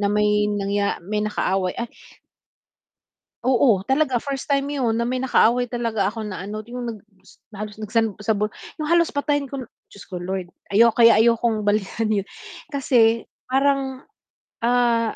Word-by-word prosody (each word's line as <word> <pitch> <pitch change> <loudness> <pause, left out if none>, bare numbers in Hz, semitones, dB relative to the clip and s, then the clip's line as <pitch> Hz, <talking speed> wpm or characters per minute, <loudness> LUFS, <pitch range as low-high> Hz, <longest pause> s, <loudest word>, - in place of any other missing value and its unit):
na 200 - +1
may 210 0 +2
nangya 200 -1 -1
may 210 +2 -2
nakaaway, 195 -3 -1
ay 235 0 -4 1.5
Oo, 240 -6 +3
talaga 265 -1 +1
first 275 -2 -4
time 280 0 0
yun 245 -6 0
na 235 - 0
may 255 +2 -1
nakaaway 245 -1 +3
talaga 230 -5 -1
ako 220 +1 -4
na 205 -4 -5
ano 215 +1 -5
yung 240 +1 -6
nag-s 195 -2 -21
na 205 - -11
halos 210 - -13
nagsan 220 -1 -1
sabu 210 -1 +1 0.3
yung 305 - -2
halos 340 +1 +3
patayin 285 -1 -1
ko 275 - -4
n 250 - -7 0.2
Diyos 200 - -13
ko 185 - -7
Lord! 180 0 -4 0.2
Ayo 230 +2 +5
kaya 230 -2 +6
ayokong 230 -2 +2
balikan 215 +2 0
yun. 210 -2 +1 0.5
Kasi 230 -5 +2 0.2
parang, 270 -1 +1 0.5
ah, 235 -1 +2
230 Hz, 160 wpm, -22 LUFS, 210-255 Hz, 1.5 s, kaya